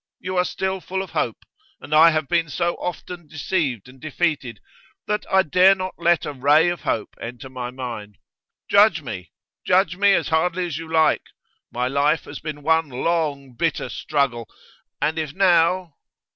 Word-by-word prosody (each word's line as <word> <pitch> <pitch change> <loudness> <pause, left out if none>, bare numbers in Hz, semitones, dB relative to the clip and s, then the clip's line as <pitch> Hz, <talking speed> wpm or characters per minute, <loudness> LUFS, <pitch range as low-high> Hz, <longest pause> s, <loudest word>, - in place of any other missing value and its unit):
You 185 +1 -5
are 180 - +3
still 190 0 -3
full 190 +2 -3
of 190 - -11
hope, 115 - -2 0.3
and 150 - -7
I 160 +2 +8
have 155 -2 -1
been 165 -1 +1
so 170 +4 0
often 175 -1 -6
deceived 145 - -2
and 130 +1 -16
defeated 150 - -2 0.5
that 210 0 -2
I 190 0 +5
dare 185 +4 +5
not 185 0 -5
let 170 -1 +2
a 145 - -4
ray 145 +5 +4
of 175 -3 -4
hope 110 - -2
enter 120 +2 -7
my 125 -2 -5
mind. 115 -6 -7 0.5
Judge 205 -5 +4
me; 95 -9 -7 0.3
judge 180 -1 +2
me 200 0 +5
as - - +1
hardly 175 +3 +1
as 160 -3 -4
you 165 -1 -9
like. 160 -1 +3 0.5
My 125 +1 -1
life 145 +4 +1
has 145 - -9
been 150 -2 -7
one 160 0 +2
long, 140 -1 -2
bitter 165 +7 -1
struggle, 130 -6 -1 0.5
and 155 +3 0
if 150 -2 -4
now 180 -2 +3
160 Hz, 170 wpm, -22 LUFS, 135-175 Hz, 0.5 s, I